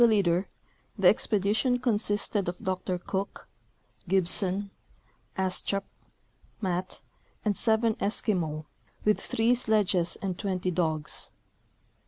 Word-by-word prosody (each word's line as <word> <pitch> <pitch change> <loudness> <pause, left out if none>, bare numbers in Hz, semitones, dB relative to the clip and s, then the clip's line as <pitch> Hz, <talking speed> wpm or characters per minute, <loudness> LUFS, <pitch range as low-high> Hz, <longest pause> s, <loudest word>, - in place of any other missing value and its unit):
203 225 -2 +6
leader, 180 -1 +2 0.5
the - - +4
expedition 215 +5 +3
consisted 205 -5 +2
of 175 - -5
Dr 185 0 -2
Cook, 190 +2 -4 0.6
Gibson, 190 +2 +1 0.7
Astrup, 190 +1 0 0.8
Matt 185 -3 -3 0.4
and 210 -1 +2
seven 225 +1 +3
Eskimo, 175 -8 -1 0.4
with 210 0 +3
three 225 +2 +2
sledges 210 -7 +1
and 185 -3 -3
20 185 -2 -1
dogs. 160 -3 -1
195 Hz, 100 wpm, -28 LUFS, 180-215 Hz, 0.8 s, 203